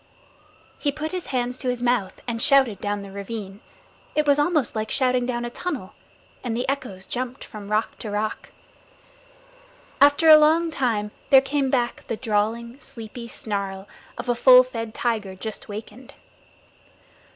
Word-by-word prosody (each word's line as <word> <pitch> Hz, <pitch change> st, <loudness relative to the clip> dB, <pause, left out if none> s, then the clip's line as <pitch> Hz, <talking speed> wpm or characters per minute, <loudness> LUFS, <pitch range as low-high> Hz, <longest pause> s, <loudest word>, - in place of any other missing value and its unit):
He 290 Hz, -, +1 dB
put 305 Hz, +2 st, -5 dB
his 365 Hz, -2 st, -4 dB
hands 250 Hz, -1 st, -2 dB
to 255 Hz, -, -1 dB
his 245 Hz, -1 st, -2 dB
mouth 240 Hz, -6 st, 0 dB
and 230 Hz, -1 st, -2 dB
shouted 265 Hz, -7 st, +4 dB
down 205 Hz, -1 st, -2 dB
the 200 Hz, -, -10 dB
ravine 200 Hz, 0 st, -6 dB, 0.6 s
it 300 Hz, -, +2 dB
was 285 Hz, 0 st, +4 dB
almost 300 Hz, -5 st, +1 dB
like 215 Hz, 0 st, -2 dB
shouting 255 Hz, -2 st, +1 dB
down 240 Hz, -1 st, -2 dB
a 240 Hz, -, -5 dB
tunnel 285 Hz, -, -5 dB, 0.5 s
and 235 Hz, -2 st, -2 dB
the 245 Hz, -, -2 dB
echoes 250 Hz, -9 st, -3 dB
jumped 255 Hz, +3 st, -4 dB
from 205 Hz, -2 st, -10 dB
rock 215 Hz, +1 st, -1 dB
to 215 Hz, -, -5 dB
rock. 210 Hz, +1 st, -3 dB, 1.5 s
After 285 Hz, +3 st, +6 dB
a 310 Hz, -1 st, +10 dB
long 320 Hz, +2 st, +3 dB
time 225 Hz, -8 st, -1 dB, 0.2 s
there 270 Hz, -, +9 dB
came 270 Hz, 0 st, -1 dB
back 245 Hz, -3 st, -1 dB
the 225 Hz, -, -3 dB
drawling, 230 Hz, +2 st, -1 dB
sleepy 235 Hz, -1 st, -9 dB
snarl 200 Hz, -3 st, -4 dB, 0.3 s
of -, -, -6 dB
a 245 Hz, -, +3 dB
full 255 Hz, +1 st, +8 dB
fed 230 Hz, -3 st, -6 dB
tiger 215 Hz, -5 st, -2 dB
just 215 Hz, +3 st, -7 dB
wakened. 220 Hz, +5 st, -9 dB
240 Hz, 160 wpm, -24 LUFS, 215-270 Hz, 1.5 s, a